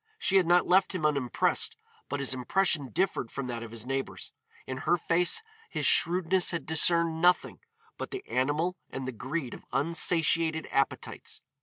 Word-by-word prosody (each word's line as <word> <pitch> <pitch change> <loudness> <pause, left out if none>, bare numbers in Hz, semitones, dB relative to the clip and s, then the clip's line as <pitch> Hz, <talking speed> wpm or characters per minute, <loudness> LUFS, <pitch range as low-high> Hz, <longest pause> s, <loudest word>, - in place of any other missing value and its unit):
She 195 - +2
had 185 -3 +3
not 175 +1 +4
left 185 +2 +2
him 160 -4 -2
unimpressed, 140 -5 0 0.3
but 145 - -3
his 135 -1 0
impression 145 +2 0
differed 175 -8 -1
from 140 - -5
that 120 -2 -5
of 115 - -8
his 115 0 -7
neighbors. 135 +1 -4 0.3
In 130 - -5
her 170 +6 +1
face 175 - +1 0.3
his - - -2
shrewdness 180 +1 +3
had 170 - -3
discerned 165 +1 +3
nothing 180 +1 +2 0.4
but - - -5
the 390 0 -7
animal 150 +8 0
and 135 -1 -6
the - - -3
greed 130 +3 -5
of - - -11
unsatiated 165 0 +1
appetites. 135 0 -3
160 Hz, 165 wpm, -28 LUFS, 135-175 Hz, 0.4 s, not